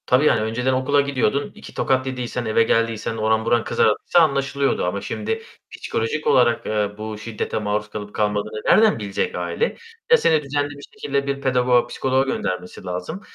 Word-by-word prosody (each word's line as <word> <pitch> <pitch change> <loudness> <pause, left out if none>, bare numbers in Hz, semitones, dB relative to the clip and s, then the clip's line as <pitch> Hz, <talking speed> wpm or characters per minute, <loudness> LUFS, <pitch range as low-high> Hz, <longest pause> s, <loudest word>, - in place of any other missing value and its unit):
Tabii 130 +4 +3
yani, 115 - +4
önceden 120 +4 0
okula 130 +3 +2
gidiyordun, 140 -1 0
2 - - -12
tokat 130 0 0
yediysen, 125 -1 -3
eve 110 +1 +3
geldiysen, 115 0 0
oran 110 0 +1
buran 120 -1 +2
kızardıysa 110 +10 +2
anlaşılıyordu 140 - +1
ama 95 +3 -2
şimdi 450 0 -3 0.3
psikolojik 115 +8 -3
olarak, 120 -2 +3
eee, 105 -1 0
bu 110 0 -5
şiddete 110 0 -4
maruz 105 0 -2
kalıp 105 -1 -7
kalmadığını 105 0 -1
nereden 215 - +5
bilecek 100 -2 -2
aile? 85 -1 -2 0.3
Ya, 480 - +9
seni 160 - +2
düzenli 145 +1 -1
bir 145 0 -11
şekilde 140 -1 -2
bir 140 0 -2
pedagoga, 125 -2 +2
psikoloğa 130 0 +1
göndermesi 90 -8 -4
lazım 90 - -5
120 Hz, 165 wpm, -22 LUFS, 105-140 Hz, 0.3 s, Ya